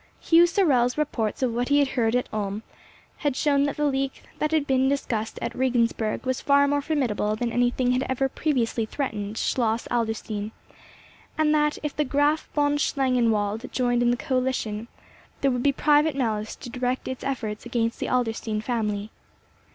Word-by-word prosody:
Hugh 340 +1 +5
Sorel's 280 -10 +2
reports 260 -6 -1
of 245 -3 +1
what 245 +2 -1
he 285 0 +4
heard 235 -3 0
at 250 - 0
Ulm 205 0 -3 0.5
had 290 -4 -1
shown 280 0 +2
that 285 - -3
the 295 - +1
league 270 -1 -1 0.2
that 305 - +1
had 310 -2 +1
been 265 -1 +2
discussed 225 -6 -2
at - - -3
Regensburg 235 -4 0
was 260 -1 -1
far 280 0 +4
more 285 0 +1
formidable 250 -8 0
than 235 +1 -2
anything 245 +1 +1
that 250 +1 +1
had - - -4
ever 260 +1 +1
previously 245 -6 -1
threatened 215 -6 -4
Schloss 230 -2 0
Adlerstein, 220 -2 -2 0.8
and 310 -1 +3
that 300 0 +2
if 300 - -3
the 300 - +1
Graf 290 +3 +1
von 290 0 +2
Schlangenwald 235 -5 +1
joined 245 -1 +1
in 240 - +3
the 245 - +2
coalition, 250 -4 -2 0.5
there 275 - +3
would 250 -1 -1
be 280 - +3
private 295 +1 +3
malice 220 -5 -1
to 245 - -9
direct 250 +1 -2
its 260 -1 -5
efforts 220 -6 -3
against 230 -1 -1
the - - -2
Adlerstein 225 -3 -1
family. 215 -2 -2
250 Hz, 175 wpm, -25 LUFS, 225-280 Hz, 0.8 s, Hugh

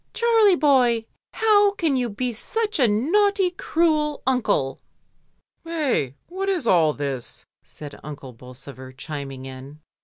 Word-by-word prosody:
"Charlie 455 -4 +4
boy, 250 -7 +3 0.3
how 415 -2 +4
can 325 -8 0
you 250 -2 0
be 245 +4 -3
such 425 - -2
a 250 - +5
naughty, 370 - +2
cruel 310 -4 0
uncle." 230 - 0 0.8
"Hey! 295 - -1
what 385 +3 -3
is 360 -9 -1
all 165 -7 +4
this?" 140 -4 -5 0.2
said 145 -1 -11
Uncle 140 -3 -9
Bolsover, 130 +2 -12
chiming 135 -2 -7
in. 135 +3 -10
250 Hz, 125 wpm, -23 LUFS, -, 0.8 s, a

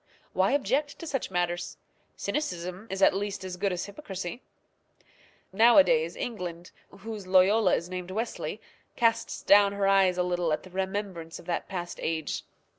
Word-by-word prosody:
Why 190 +7 +2
object 285 +1 0
to - - -8
such 270 -5 -2
manners? 175 -1 -2 0.4
Cynicism 185 - -3
is 195 0 -1
at - - +6
least 200 0 -3
as 185 -1 -5
good 195 +2 0
as 180 0 -3
hypocrisy. 200 - -6 1.1
Nowadays 285 - +5
England, 180 -7 -5 0.2
whose 210 -1 -8
Loyola 190 +2 +5
is 170 - -3
named 180 0 -6
Wesley, 220 +5 -3 0.4
casts 230 -1 +1
down 200 0 +6
her 200 -1 0
eyes 195 -2 +4
a 180 - +2
little 175 -2 0
at - - -2
the 185 - -13
remembrance 190 -3 -3
of - - -13
that 175 -1 -2
past 175 -2 -5
age. 160 -2 -2
190 Hz, 155 wpm, -28 LUFS, 180-220 Hz, 1.1 s, at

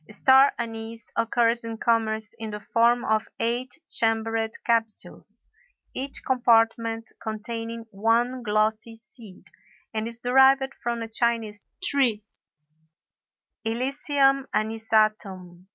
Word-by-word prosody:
Star 265 +5 +5
anise 225 -1 -6
occurs 230 +1 +2
in 225 -1 -5
commerce 220 -2 0
in 220 -1 -5
the 210 0 -5
form 235 +3 +2
of 220 0 +1
eight 240 +2 -2
chambered 225 0 0 0.2
capsules, 225 -2 -1 0.5
each 270 +1 -4
compartment 230 -2 +2
containing 225 +1 -5
one 230 +5 +1
glossy 215 +1 0
seed, 225 -4 -10 0.5
and 220 0 -2
is 230 0 -7
derived 265 +2 +4
from 235 -1 -3
a - - -5
Chinese 225 -2 -1 0.2
tree, 260 - +2 1.4
Illicium 270 +3 +1
anisatum. 215 -5 0
230 Hz, 105 wpm, -25 LUFS, 220-240 Hz, 1.4 s, Star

